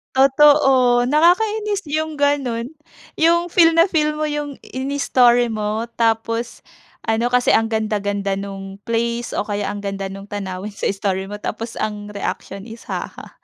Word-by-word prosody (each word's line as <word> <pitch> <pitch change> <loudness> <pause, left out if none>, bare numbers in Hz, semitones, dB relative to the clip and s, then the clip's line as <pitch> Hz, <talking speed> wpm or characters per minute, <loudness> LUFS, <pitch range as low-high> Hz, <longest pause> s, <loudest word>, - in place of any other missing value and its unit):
Totoo. 270 -3 +5
Nakakainis 400 - +2
yung 310 +1 -2
ganun, 275 -3 0 0.4
yung 340 +1 +3
feel 330 -1 +4
na 335 - +7
feel 305 -4 0
mo 310 - -1
yung 295 -2 -4
inistory 255 -3 +2
mo, 215 +1 -2
tapos 230 +1 -1 0.4
ano 225 +2 +1
kasi 250 0 +3
ang 225 0 +3
ganda-ganda 205 -2 -1
nung 195 0 -7
place 235 +1 -2
o - - -1
kaya 205 -1 -2
ang 205 0 -5
ganda 195 -1 -3
nung 195 +1 -9
tanawin 195 -1 -5
sa - - -5
story 195 -1 -2
mo 205 - -5
tapos 225 +2 -5
ang 210 -1 -4
reaksyon 200 -1 -5
is, 230 0 -11
"Haha." - - -6
235 Hz, 145 wpm, -20 LUFS, 205-290 Hz, 0.4 s, na